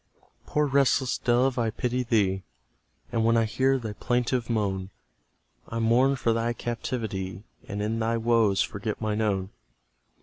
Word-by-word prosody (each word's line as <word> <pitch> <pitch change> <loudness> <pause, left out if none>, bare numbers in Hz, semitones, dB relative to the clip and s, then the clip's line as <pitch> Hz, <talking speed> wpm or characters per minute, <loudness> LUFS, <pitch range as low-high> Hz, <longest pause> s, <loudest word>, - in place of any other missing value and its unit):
Poor 150 0 +1
restless 135 -2 +2
dove, 125 +1 +2
I 115 -1 +1
pity 125 +3 -1
thee; 100 -6 +1 0.7
And 115 - +1
when 115 +1 +4
I 115 - +3
hear 130 +5 +2
thy 110 -4 -5
plaintive 120 +1 -1
moan, 95 -4 -1 0.8
I 115 - -5
mourn 120 +4 +3
for 115 -3 +1
thy 115 +1 0
captivity, 110 -6 -4 0.2
And 105 +1 -3
in 110 +2 -1
thy 115 +1 +1
woes 115 -4 +3
forget 100 +1 -4
mine 110 0 -1
own. 95 -3 0
115 Hz, 145 wpm, -27 LUFS, 105-125 Hz, 0.8 s, when